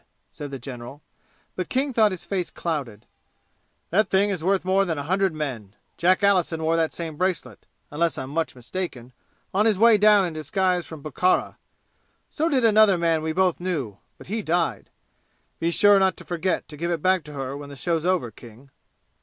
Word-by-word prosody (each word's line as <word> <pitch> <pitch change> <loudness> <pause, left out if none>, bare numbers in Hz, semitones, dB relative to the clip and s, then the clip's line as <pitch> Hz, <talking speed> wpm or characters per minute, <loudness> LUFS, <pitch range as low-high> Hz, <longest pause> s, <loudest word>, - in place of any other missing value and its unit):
said 145 - -7
the 135 - -6
general, 125 +2 -9 0.5
but 185 - -4
King 270 +1 0
thought 220 -2 +4
his 185 -3 -6
face 185 -3 -2
clouded. 135 -11 -4 0.9
"That 200 +3 +2
thing 200 +2 +2
is 180 -5 -4
worth 190 +1 +1
more 190 +1 +3
than 165 -5 -2
a 145 - -3
hundred 190 +4 +1
men. 125 -10 -5 0.2
Jack 185 +3 +2
Allison 180 -5 +2
wore 160 +1 +2
that 165 -1 +1
same 160 -3 -6
bracelet, 185 0 -3 0.2
unless 160 0 0
I'm 130 +1 -5
much 165 -1 -2
mistaken, 125 -2 -6 0.4
on 210 +4 +3
his 215 -3 +2
way 225 0 +6
down 210 -1 +6
in 170 - -4
disguise 180 +3 -1
from 155 -3 -10
Bukhara. 170 +5 0 0.7
So 320 +2 0
did 260 -5 +2
another 215 -3 +5
man 165 -2 +1
we 160 0 -2
both 185 +1 +1
knew; 145 - -3 0.2
but - - -13
he 220 +4 -3
died. 165 - -1 0.7
Be 165 - 0
sure 205 +3 +5
not 190 -1 +2
to - - -12
forget 175 0 -2
to 150 - -10
give 170 +3 -2
it 170 -3 -2
back 185 -2 +3
to 150 - -10
her 135 -1 -4
when 145 0 -8
the 140 - -9
show's 165 +2 -1
over, 175 -10 0
King." 120 +5 -15
170 Hz, 195 wpm, -24 LUFS, 145-190 Hz, 0.9 s, way